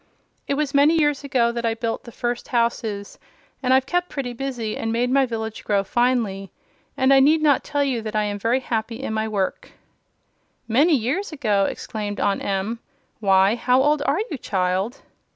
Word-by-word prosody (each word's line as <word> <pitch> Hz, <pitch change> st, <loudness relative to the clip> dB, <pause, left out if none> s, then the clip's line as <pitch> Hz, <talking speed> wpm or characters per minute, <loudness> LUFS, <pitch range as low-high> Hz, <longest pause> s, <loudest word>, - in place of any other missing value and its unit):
It 280 Hz, -, 0 dB
was 295 Hz, -1 st, -1 dB
many 285 Hz, +3 st, +5 dB
years 295 Hz, -2 st, +1 dB
ago 255 Hz, -4 st, +1 dB
that 235 Hz, 0 st, -4 dB
I 225 Hz, -1 st, 0 dB
built 230 Hz, 0 st, -3 dB
the 235 Hz, -, -10 dB
first 240 Hz, +1 st, -3 dB
houses, 230 Hz, -4 st, -2 dB, 0.4 s
and 255 Hz, -2 st, 0 dB
I've 260 Hz, 0 st, +4 dB
kept 355 Hz, +4 st, -1 dB
pretty 255 Hz, -4 st, -4 dB
busy 240 Hz, -4 st, -4 dB
and 225 Hz, -, -3 dB
made 245 Hz, +2 st, 0 dB
my 270 Hz, 0 st, +3 dB
village 220 Hz, -2 st, -5 dB
grow 200 Hz, -1 st, +1 dB
finely; 220 Hz, -4 st, 0 dB, 0.5 s
and 260 Hz, +1 st, +4 dB
I 270 Hz, -, +7 dB
need 300 Hz, +4 st, +5 dB
not 290 Hz, -4 st, +3 dB
tell 290 Hz, -1 st, 0 dB
you 260 Hz, -5 st, -1 dB
that 220 Hz, 0 st, -6 dB
I 215 Hz, -, +2 dB
am 205 Hz, -1 st, -3 dB
very 235 Hz, +5 st, +1 dB
happy 230 Hz, -1 st, -2 dB
in 220 Hz, -, -3 dB
my 220 Hz, 0 st, -1 dB
work." 200 Hz, -3 st, -3 dB, 0.9 s
"Many 290 Hz, +8 st, +4 dB
years 280 Hz, -, -1 dB
ago!" 215 Hz, -10 st, +1 dB
exclaimed 205 Hz, -1 st, -4 dB
Aunt 200 Hz, -, 0 dB
Em. 200 Hz, +4 st, -2 dB, 0.4 s
"Why, 195 Hz, -1 st, +4 dB
how 250 Hz, +2 st, +2 dB
old 295 Hz, +1 st, +2 dB
are 285 Hz, -, +2 dB
you, 290 Hz, -, -4 dB
child?" 190 Hz, +4 st, -1 dB
235 Hz, 190 wpm, -22 LUFS, 215-270 Hz, 0.9 s, I